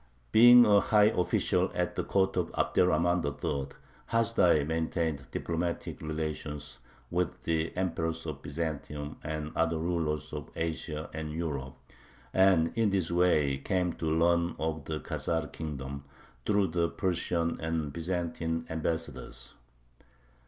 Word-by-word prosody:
Being 120 - +9
a 105 -2 +6
high 105 +1 +4
official 90 - +1
at - - -1
the - - -1
court 95 0 +1
of 90 -2 -1
Abderrahman 85 0 +2
III., 70 -1 -2 0.4
Hasdai 115 -10 +3
maintained 80 -3 -1
diplomatic 85 +1 -3
relations 75 -2 -4 0.3
with 90 -1 -1
the 80 0 0
emperors 80 -3 -1
of 75 -4 -5
Byzantium 75 -1 -4
and 75 0 -4
other 80 0 +1
rulers 80 -3 -2
of - - -6
Asia 80 -1 -3
and 80 -1 -4
Europe, 75 -5 -4 0.6
and 95 -4 +4
in 115 -2 +3
this 95 -4 0
way 75 -6 +3
came 90 +3 0
to 80 - -4
learn 85 +2 +2
of 80 -2 -3
the 80 0 -3
Khazar 80 -3 -2
kingdom, 70 -2 -5 0.4
through 100 -3 +3
the 85 0 +1
Persian 85 -2 -1
and 80 -3 -2
Byzantine 85 -1 -2
ambassadors. 80 -4 -4
80 Hz, 125 wpm, -30 LUFS, 75-90 Hz, 0.6 s, Being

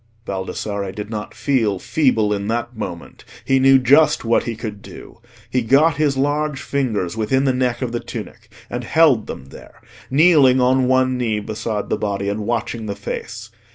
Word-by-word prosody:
Baldassarre 100 +1 -4
did 105 +2 -7
not 105 -1 -6
feel 115 -8 0
feeble 110 -4 +1
in 100 0 -3
that 120 +2 -2
moment. 90 -6 -7 0.2
He 135 0 +3
knew 135 0 +6
just 135 +2 +4
what 115 +1 +2
he 115 - -3
could 105 -2 -7
do. - - -12 0.3
He 130 - 0
got 140 +7 +3
his 145 -3 +1
large 145 +1 0
fingers 110 -11 -2
within 115 +5 +1
the 135 -2 +2
neck 125 -1 -1
of 120 - -3
the 120 - -2
tunic - - -9 0.2
and 120 +1 -5
held 145 -4 +3
them 65 - -8
there, - - -14 0.3
kneeling 140 -3 +5
on 130 0 +3
one 130 0 +2
knee 110 -3 0
beside 110 0 -4
the - - +1
body 100 -1 -2
and 105 +1 -3
watching 115 -1 -2
the 100 - -3
face. - - -7
120 Hz, 180 wpm, -20 LUFS, 105-135 Hz, 0.3 s, knew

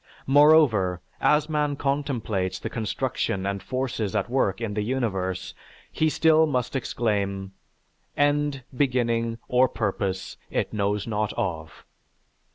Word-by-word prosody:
Moreover, 135 - +5 0.2
as 150 0 +3
man 150 -2 0
contemplates 125 -10 -1
the - - -6
construction 100 -3 -2
and 100 0 -2
forces 120 -5 -2
at 105 +2 -1
work 110 -7 +1
in 115 -3 -3
the 105 - -1
universe 100 -6 -2 0.4
he 155 - +1
still 160 0 +4
must 125 -2 -1
exclaim, 100 -6 -1 0.7
"end, 145 -2 +1
beginning, 115 -4 +1
or 125 +1 +4
purpose, 100 -4 -2
it - - -2
knows 105 -1 0
not 105 -2 -1
of." 80 -4 -4
115 Hz, 120 wpm, -25 LUFS, 100-140 Hz, 0.7 s, Moreover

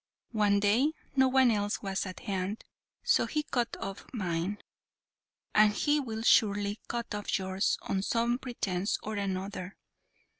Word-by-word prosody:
One 205 -2 +3
day 230 +10 +3 0.2
no 265 -1 +5
one 260 -1 +5
else 205 -1 -1
was 195 0 -2
at 185 - -8
hand, 195 0 -3 0.4
so - - +3
he 305 -1 -1
cut 240 -5 -1
off 195 0 -5
mine, 185 -3 -2 1.0
and 215 0 +6
he 295 +6 +2
will 225 -5 -4
surely 205 -2 +3
cut 235 -2 -3
off 205 0 -1
yours 190 +1 0
on 190 - -1
some 235 +4 +1
pretence 200 -7 -2
or 215 - -4
another. 195 -1 -3
205 Hz, 145 wpm, -30 LUFS, 195-235 Hz, 1.0 s, and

